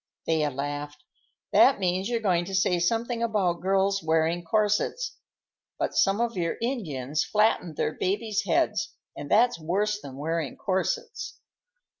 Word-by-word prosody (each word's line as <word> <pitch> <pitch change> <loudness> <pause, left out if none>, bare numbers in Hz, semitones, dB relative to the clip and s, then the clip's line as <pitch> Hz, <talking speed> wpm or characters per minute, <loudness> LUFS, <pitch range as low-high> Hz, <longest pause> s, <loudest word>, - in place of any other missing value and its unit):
Thea 155 -2 +1
laughed. 145 +2 -5 0.5
"That 270 - +6
means 185 +2 0
you're 235 -2 0
going 175 -5 +2
to 195 +1 -4
say 180 -2 +2
something 230 +6 0
about 195 -7 0
girls' 195 +1 +2
wearing 160 +2 +1
corsets. 210 - 0 0.6
But - - -1
some 195 +2 +3
of 235 0 0
your 170 -2 -1
Indians 155 - -2
flattened 210 -6 +1
their - - 0
babies' 205 +2 -1
heads, 165 - +1 0.2
and 145 - -7
that's 235 -2 +4
worse 210 +6 0
than 135 -2 -9
wearing 160 -1 -2
corsets." 440 - -2
185 Hz, 140 wpm, -27 LUFS, 160-215 Hz, 0.6 s, That